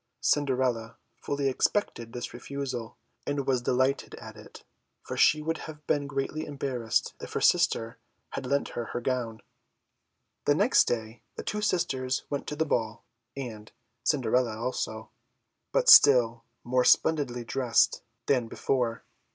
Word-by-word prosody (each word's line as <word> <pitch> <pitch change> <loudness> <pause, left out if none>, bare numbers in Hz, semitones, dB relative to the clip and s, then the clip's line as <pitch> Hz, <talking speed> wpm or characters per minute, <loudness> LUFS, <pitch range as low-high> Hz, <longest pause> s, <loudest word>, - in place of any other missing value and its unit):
Cinderella 130 -5 0 0.2
fully 140 -1 -2
expected 130 - -1
this 120 0 -6
refusal, 125 -2 -5 0.3
and 145 -1 -1
was 130 -2 +1
delighted 130 +3 0
at - - -11
it, - - -13 0.4
for - - -6
she 150 0 +4
would 165 +1 -2
have 150 -1 -11
been 145 -1 0
greatly 140 +2 -3
embarrassed 130 -5 -2
if - - -8
her - - 0
sister 115 +1 +2 0.3
had 130 - -5
lent 140 +2 0
her 120 - -4
her 120 - -4
gown. 120 -3 -3 1.0
The - - +4
next - - +4
day 115 -1 -3
the - - -6
two 210 - -3
sisters 130 -10 0
went 145 - -3
to 150 - -4
the 160 +1 0
ball, 115 -5 -2 0.3
and 110 -5 -7 0.3
Cinderella 125 -4 +1
also, 110 -2 -4 0.6
but - - +1
still 120 -5 +7 0.2
more 125 +1 +1
splendidly 130 -5 +2
dressed 120 0 +2 0.2
than 125 -4 +1
before. 120 -1 -1
130 Hz, 140 wpm, -28 LUFS, 115-140 Hz, 1.0 s, still